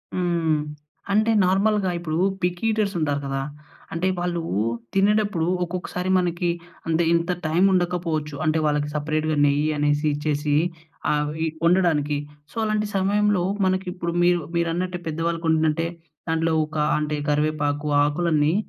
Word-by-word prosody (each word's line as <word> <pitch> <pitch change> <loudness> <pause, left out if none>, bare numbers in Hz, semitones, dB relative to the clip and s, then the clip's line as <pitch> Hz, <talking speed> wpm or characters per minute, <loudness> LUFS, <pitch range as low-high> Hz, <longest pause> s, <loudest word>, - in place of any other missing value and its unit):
హ్మ్. 170 -4 +1 0.5
అంటే 215 +3 +3
నార్మల్‍గా 195 +1 +2
ఇప్పుడు 160 -2 -3 0.2
పిక్కీ 180 +3 -1
ఈటర్స్ 210 -3 0
ఉంటారు 145 -2 0
కదా. 135 0 -2 0.5
అంటే 165 +3 0
వాళ్ళు 175 -1 -1 0.5
తినేటప్పుడు 200 -3 +2 0.2
ఒక్కొక్కసారి 180 +1 -4
మనకి 175 -1 0 0.4
అంటే 165 +1 +2
ఇంత 170 +1 +1 0.2
టైం 165 +4 +2
ఉండకపోవచ్చు 170 -4 -1
అంటే 155 +1 +2
వాళ్ళకి 150 -1 +1
సెపరేట్‌గా 155 +1 -1
నెయ్యి 145 +2 +2
అనేసి 145 +1 +1
ఇచ్చేసి 150 0 0 0.6
ఆహ్, 150 0 0
వి 160 +1 -1 0.2
వండడానికి. 165 -5 +3 0.3
సో, - - -20
అలాంటి 215 -1 0
సమయంలో 200 0 +2 0.2
మనకి 185 +1 +1
ఇప్పుడు 170 -1 -3
మీరు 175 0 +4 0.2
మీరన్నట్టే 175 +2 -1
పెద్దవాళ్ళకి 165 +1 -2
వండినంటే 160 +1 +2 0.4
దాంట్లో 165 0 +1
ఒక 155 +1 -13 0.2
అంటే, 150 0 -1
కరివేపాకు 150 0 0 0.2
ఆకులన్నీ 150 0 +2
165 Hz, 130 wpm, -23 LUFS, 150-180 Hz, 0.6 s, మీరు